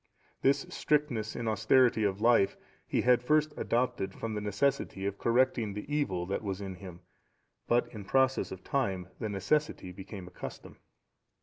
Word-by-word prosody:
This 135 Hz, +1 st, +3 dB
strictness 130 Hz, -8 st, 0 dB
in 115 Hz, -, -3 dB
austerity 110 Hz, +2 st, +4 dB
of 100 Hz, 0 st, 0 dB
life 115 Hz, -4 st, +4 dB, 0.3 s
he -, -, +1 dB
had 125 Hz, -1 st, +4 dB
first 150 Hz, +3 st, +2 dB
adopted 115 Hz, -5 st, -1 dB
from 115 Hz, -1 st, -4 dB
the 105 Hz, -, -2 dB
necessity 105 Hz, -1 st, 0 dB
of 100 Hz, 0 st, -3 dB
correcting 120 Hz, -3 st, +2 dB
the 105 Hz, -, -5 dB
evil 95 Hz, -13 st, 0 dB
that 95 Hz, +2 st, -2 dB
was 100 Hz, -3 st, -3 dB
in 95 Hz, -2 st, -5 dB
him; 90 Hz, -1 st, -10 dB, 0.7 s
but 120 Hz, +1 st, +3 dB
in 105 Hz, -2 st, -7 dB
process 130 Hz, +5 st, +2 dB
of 95 Hz, -, -8 dB
time 95 Hz, -10 st, -1 dB
the 110 Hz, -, -2 dB
necessity 100 Hz, +1 st, 0 dB
became 95 Hz, 0 st, -9 dB
a -, -, -11 dB
custom. -, -, -9 dB
110 Hz, 165 wpm, -31 LUFS, 95-130 Hz, 0.7 s, austerity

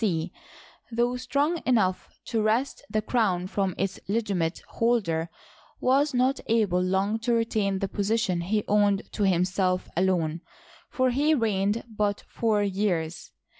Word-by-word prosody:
C), 175 Hz, -5 st, -1 dB, 0.6 s
though 240 Hz, +2 st, +1 dB
strong 285 Hz, +6 st, 0 dB
enough 205 Hz, -7 st, +1 dB, 0.2 s
to 225 Hz, -2 st, -1 dB
wrest 225 Hz, +6 st, 0 dB
the 215 Hz, 0 st, -1 dB
crown 200 Hz, -7 st, +1 dB
from 190 Hz, -1 st, -1 dB
its 195 Hz, 0 st, -2 dB
legitimate 195 Hz, -6 st, -1 dB
holder, 195 Hz, -9 st, 0 dB, 0.5 s
was 275 Hz, +3 st, +3 dB
not 260 Hz, +2 st, +2 dB
able 210 Hz, -6 st, +2 dB
long 195 Hz, +4 st, 0 dB
to 235 Hz, +1 st, 0 dB
retain 215 Hz, -4 st, 0 dB
the 195 Hz, -, -1 dB
position 200 Hz, -3 st, 0 dB
he 210 Hz, +4 st, 0 dB
owed 205 Hz, -1 st, +2 dB
to 205 Hz, -, 0 dB
himself 185 Hz, 0 st, +1 dB
alone; 170 Hz, -3 st, +1 dB, 0.5 s
for 255 Hz, -1 st, +1 dB
he 295 Hz, +5 st, +3 dB
reigned 210 Hz, -2 st, 0 dB
but 210 Hz, -2 st, -1 dB
four 215 Hz, -3 st, +1 dB
years. 185 Hz, -5 st, -1 dB
205 Hz, 135 wpm, -26 LUFS, 185-230 Hz, 0.6 s, was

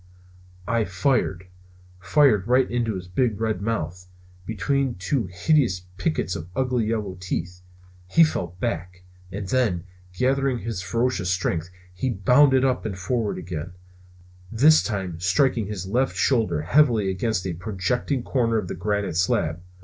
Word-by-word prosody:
I 115 Hz, -1 st, +1 dB
fired! 95 Hz, -2 st, 0 dB, 0.5 s
fired 105 Hz, -, +3 dB
right 125 Hz, +1 st, +4 dB
into 115 Hz, -3 st, 0 dB
his 90 Hz, -1 st, -6 dB
big 105 Hz, +3 st, 0 dB
red 110 Hz, -4 st, -1 dB
mouth, 90 Hz, -5 st, -3 dB, 0.4 s
between 135 Hz, +4 st, 0 dB
two 95 Hz, +4 st, -1 dB
hideous 95 Hz, -, +2 dB, 0.2 s
pickets 90 Hz, +1 st, -1 dB
of 85 Hz, -2 st, -7 dB
ugly 125 Hz, -4 st, 0 dB
yellow 105 Hz, -5 st, -2 dB
teeth. 90 Hz, -1 st, -4 dB, 0.5 s
He 165 Hz, -, +5 dB
fell 90 Hz, -, -1 dB
back, 90 Hz, +2 st, -4 dB, 0.3 s
and 100 Hz, +1 st, -5 dB
then, 110 Hz, -8 st, +1 dB, 0.3 s
gathering 135 Hz, +2 st, +1 dB
his 115 Hz, -5 st, -4 dB
ferocious 110 Hz, 0 st, -1 dB
strength, 90 Hz, -2 st, -1 dB, 0.2 s
he 95 Hz, +9 st, -2 dB
bounded 130 Hz, +6 st, +4 dB
up 130 Hz, -1 st, 0 dB
and 100 Hz, -4 st, -4 dB
forward 105 Hz, +3 st, -1 dB
again; 90 Hz, -1 st, -6 dB, 0.8 s
this 145 Hz, +8 st, +6 dB
time 95 Hz, -4 st, -3 dB
striking 100 Hz, +4 st, +2 dB
his 100 Hz, -3 st, -5 dB
left 125 Hz, +7 st, 0 dB
shoulder 105 Hz, -, +1 dB
heavily 115 Hz, -, +3 dB
against 95 Hz, 0 st, -1 dB
a 90 Hz, -, -2 dB
projecting 110 Hz, -, -2 dB
corner 115 Hz, -4 st, +1 dB
of 100 Hz, -5 st, -3 dB
the -, -, -3 dB
granite 100 Hz, -2 st, -1 dB
slab. 85 Hz, -2 st, +1 dB
105 Hz, 140 wpm, -24 LUFS, 90-125 Hz, 0.8 s, this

